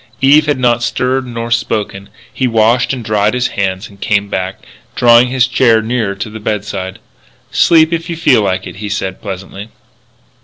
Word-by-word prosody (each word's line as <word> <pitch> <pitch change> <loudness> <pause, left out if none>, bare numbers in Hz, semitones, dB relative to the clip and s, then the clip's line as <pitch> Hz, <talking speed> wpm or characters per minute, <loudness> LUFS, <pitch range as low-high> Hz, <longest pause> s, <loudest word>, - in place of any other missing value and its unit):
Eve 150 +3 +5
had 145 - +1
not 120 -2 +1
stirred 130 +2 -1
nor 115 -1 -5
spoken. 105 -4 -2 0.2
He 130 - 0
washed 115 +2 +2
and 125 -4 -5
dried 105 +1 +1
his 125 0 0
hands 95 +1 -3
and 100 -1 -19
came 100 -1 0
back, 95 0 -4 0.3
drawing 120 +1 +5
his 125 0 +2
chair 120 -2 +3
nearer 110 -3 -2
to 100 +3 -5
the 110 - -8
bedside. 100 -3 -4 0.5
"Sleep, 160 0 +4
if 165 +1 -3
you 170 - -3
feel 135 -8 +3
like 95 -2 -1
it," - - -9
he 105 0 -5
said 95 -2 -4
pleasantly. 95 +2 -7
115 Hz, 180 wpm, -14 LUFS, 100-125 Hz, 0.5 s, Eve